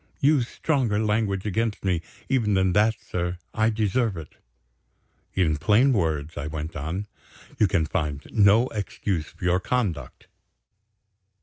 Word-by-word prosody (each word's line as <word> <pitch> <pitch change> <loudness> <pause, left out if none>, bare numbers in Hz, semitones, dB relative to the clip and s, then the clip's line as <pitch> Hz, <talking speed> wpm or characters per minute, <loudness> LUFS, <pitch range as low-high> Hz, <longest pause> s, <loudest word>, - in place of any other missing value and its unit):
"Use 140 -5 +3
stronger 130 -10 0
language 105 -2 0
against 110 +1 -1
me, 90 -3 +1 0.3
even 115 -6 +1
than 95 -1 +2
that, 110 +3 +3
sir 90 0 -3 0.2
I 110 0 +2
deserve 110 -1 0
it." 80 -3 -9 1.0
"In 80 -5 +2
plain 115 - +4
words," 80 -6 -1
I 75 - -3
went 80 +1 -5
on, 80 +8 -3 0.5
"you 105 - +5
can 85 -4 +1
find 75 -4 -2
no 105 +3 +5
excuse 100 -5 -3
for 85 +1 -9
your 90 +1 +3
conduct?" 105 -3 -2
100 Hz, 135 wpm, -25 LUFS, 85-110 Hz, 1.0 s, you